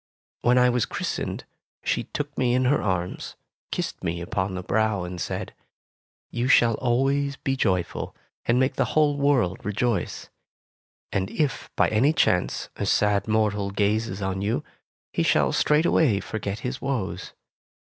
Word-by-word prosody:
When 125 Hz, +1 st, +4 dB
I 125 Hz, 0 st, +6 dB
was 120 Hz, -2 st, +1 dB
christened, -, -, -3 dB, 0.4 s
she -, -, 0 dB
took 145 Hz, -1 st, -5 dB
me 125 Hz, -1 st, +2 dB
in 130 Hz, 0 st, +2 dB
her 140 Hz, +3 st, +3 dB
arms, 90 Hz, -3 st, -2 dB, 0.4 s
kissed -, -, -3 dB
me 85 Hz, +1 st, -1 dB
upon 95 Hz, +2 st, -2 dB
the 90 Hz, -, -4 dB
brow, 110 Hz, -2 st, +1 dB
and 90 Hz, -1 st, -6 dB
said, -, -, -4 dB, 0.8 s
"You 120 Hz, +1 st, -1 dB
shall 120 Hz, -3 st, +5 dB
always 135 Hz, +3 st, +1 dB
be 135 Hz, 0 st, -2 dB
joyful, 95 Hz, -8 st, -1 dB, 0.3 s
and 120 Hz, +2 st, +3 dB
make 130 Hz, +1 st, +1 dB
the -, -, +3 dB
whole 150 Hz, -2 st, +4 dB
world 140 Hz, -10 st, +1 dB
rejoice. 105 Hz, +2 st, -1 dB, 0.8 s
And 95 Hz, 0 st, -1 dB
if, 150 Hz, -4 st, -1 dB
by -, -, +4 dB
any 130 Hz, +8 st, +3 dB
chance, 90 Hz, -, +1 dB
a -, -, -2 dB
sad 105 Hz, 0 st, +2 dB
mortal 105 Hz, -2 st, +1 dB
gazes 100 Hz, 0 st, 0 dB
on 95 Hz, 0 st, -2 dB
you, 105 Hz, +3 st, -1 dB, 0.5 s
he -, -, +1 dB
shall -, -, +3 dB
straightway 150 Hz, -7 st, +3 dB
forget 105 Hz, -1 st, -4 dB
his 130 Hz, +1 st, -4 dB
woes. 105 Hz, -9 st, -3 dB
110 Hz, 150 wpm, -25 LUFS, 100-130 Hz, 0.8 s, I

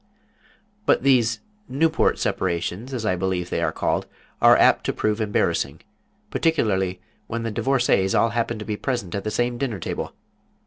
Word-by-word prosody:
But -, -, +3 dB
these 125 Hz, -4 st, +3 dB, 0.3 s
Newport 160 Hz, +4 st, +2 dB
separations, 95 Hz, +7 st, -2 dB
as 120 Hz, -4 st, -3 dB
I 95 Hz, -, +2 dB
believe 90 Hz, -1 st, -2 dB
they -, -, 0 dB
are -, -, +1 dB
called, -, -, -1 dB, 0.3 s
are -, -, +7 dB
apt -, -, +4 dB
to -, -, 0 dB
prove 110 Hz, +1 st, -1 dB
embarrassing, 105 Hz, -1 st, 0 dB, 0.5 s
particularly 95 Hz, -, +1 dB, 0.3 s
when 115 Hz, 0 st, -3 dB
the 115 Hz, -, -2 dB
divorcées 120 Hz, -6 st, +2 dB
all 115 Hz, -, +3 dB
happen 115 Hz, 0 st, -1 dB
to 105 Hz, -, -7 dB
be 105 Hz, -1 st, -3 dB
present 120 Hz, -10 st, -3 dB
at 100 Hz, -, -3 dB
the 110 Hz, -, -2 dB
same 120 Hz, +2 st, -1 dB
dinner 125 Hz, -7 st, -2 dB
table. 85 Hz, -, -4 dB
110 Hz, 165 wpm, -23 LUFS, 95-125 Hz, 0.5 s, are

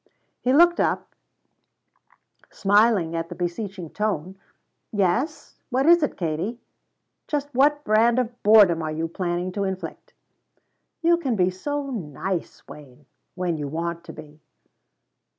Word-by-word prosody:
He 250 Hz, -, 0 dB
looked 345 Hz, +5 st, +5 dB
up, -, -, -1 dB, 1.4 s
smiling 205 Hz, -4 st, +2 dB
at 165 Hz, 0 st, -3 dB
the -, -, -7 dB
beseeching 180 Hz, -1 st, -4 dB
tone. 190 Hz, -4 st, -2 dB, 0.6 s
"Yes? 220 Hz, -, -1 dB
What 265 Hz, +1 st, +1 dB
is 340 Hz, +1 st, +6 dB
it, 295 Hz, -, -1 dB
Katie? 170 Hz, +8 st, -3 dB, 0.7 s
Just 290 Hz, -1 st, -3 dB
what 290 Hz, +3 st, +3 dB
brand 230 Hz, +2 st, +3 dB
of 245 Hz, -1 st, -2 dB
boredom 205 Hz, -6 st, +6 dB
are 155 Hz, -1 st, -3 dB
you 160 Hz, +1 st, -2 dB
planning 175 Hz, +1 st, -3 dB
to 200 Hz, +2 st, -2 dB
inflict?" 190 Hz, -1 st, -6 dB, 0.9 s
"You 340 Hz, +1 st, +4 dB
can 270 Hz, -9 st, -1 dB
be 185 Hz, -2 st, +2 dB
so 280 Hz, +9 st, -4 dB
nice, 180 Hz, -, -5 dB
Wayne 145 Hz, -1 st, -14 dB, 0.3 s
when 180 Hz, -3 st, -1 dB
you 145 Hz, -1 st, -4 dB
want 170 Hz, +3 st, -4 dB
to -, -, -9 dB
be." 150 Hz, -1 st, -13 dB
195 Hz, 135 wpm, -24 LUFS, 170-250 Hz, 1.4 s, is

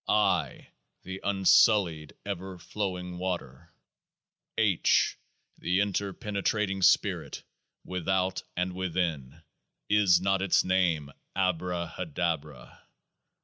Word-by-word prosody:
I. -, -, +1 dB, 0.3 s
the 95 Hz, +1 st, -7 dB
unsullied 95 Hz, -5 st, +3 dB
ever 95 Hz, -1 st, -5 dB
flowing 90 Hz, -1 st, -4 dB
water. 85 Hz, -4 st, -5 dB, 0.9 s
H. 100 Hz, -6 st, +3 dB, 0.4 s
the 90 Hz, +2 st, +1 dB
interpenetrating 100 Hz, 0 st, -1 dB
Spirit, -, -, +2 dB, 0.4 s
without 95 Hz, +1 st, -1 dB, 0.2 s
and 90 Hz, +1 st, -1 dB
within. 85 Hz, -5 st, -3 dB, 0.5 s
Is 100 Hz, -4 st, +5 dB
not 95 Hz, +1 st, +1 dB
its 95 Hz, -2 st, +3 dB
name 85 Hz, -6 st, +1 dB, 0.2 s
ABRAHADABRA? 85 Hz, -6 st, -2 dB
90 Hz, 80 wpm, -28 LUFS, 85-95 Hz, 0.9 s, Is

